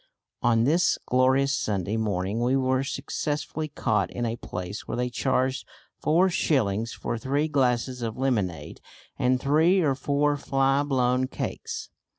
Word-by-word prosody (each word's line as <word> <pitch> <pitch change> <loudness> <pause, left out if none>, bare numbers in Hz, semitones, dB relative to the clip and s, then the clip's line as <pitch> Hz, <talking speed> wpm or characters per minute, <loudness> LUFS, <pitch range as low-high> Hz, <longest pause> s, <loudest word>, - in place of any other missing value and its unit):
On 115 -1 +3
this 160 +7 +3
glorious 130 +2 +3
Sunday 100 -4 -1
morning 105 0 -1
we 125 +2 +2
were 130 0 +1
successfully 150 +3 -3
caught 110 -9 0
in 120 - -3
a 115 0 -1
place 90 -3 -6
where - - -3
they 125 0 -1
charged 130 +1 0 0.4
four 170 +5 +3
shillings 115 - 0
for 115 - -4
three 140 +5 0
glasses 125 -3 0
of 115 -2 -3
lemonade 110 -10 -2 0.4
and 125 0 +2
three 160 +8 +3
or 145 -5 +2
four 145 +2 +1
fly 135 0 +1
blown 130 -2 +1
cakes. - - -5
130 Hz, 145 wpm, -26 LUFS, 115-140 Hz, 0.4 s, On